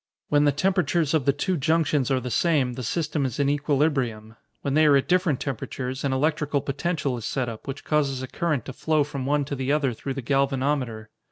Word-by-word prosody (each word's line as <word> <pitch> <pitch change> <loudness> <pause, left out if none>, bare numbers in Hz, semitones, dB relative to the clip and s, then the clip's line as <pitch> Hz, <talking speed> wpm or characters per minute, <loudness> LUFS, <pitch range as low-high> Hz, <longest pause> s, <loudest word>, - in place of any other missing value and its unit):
When 145 0 +4
the 145 - +5
temperatures 170 -1 +1
of 155 -5 +2
the 140 - +5
two 175 +6 -1
junctions 155 -3 +1
are 135 -1 +2
the 125 0 -5
same, 140 -2 +2
the 130 - -6
system 150 +4 -1
is 130 -1 -3
in 140 -1 +2
equilibrium. 135 -7 0 0.3
When 140 - -1
they 155 +1 +5
are 145 - +6
at 135 - -1
different 180 -6 +2
temperatures, 130 0 -4
an 140 - 0
electrical 150 +1 +1
potential 145 -1 -2
is 115 - -7
set 130 -2 -1
up, 115 -2 -8
which 135 +1 -6
causes 140 -4 0
a - - -4
current 155 -4 -1
to 135 - -6
flow 150 +2 +1
from 140 -2 -5
one 145 0 +1
to 140 - -4
the 135 +1 -1
other 145 -4 +1
through 135 +4 -5
the 135 - -5
galvanometer. 135 -4 0
140 Hz, 215 wpm, -25 LUFS, 130-150 Hz, 0.3 s, are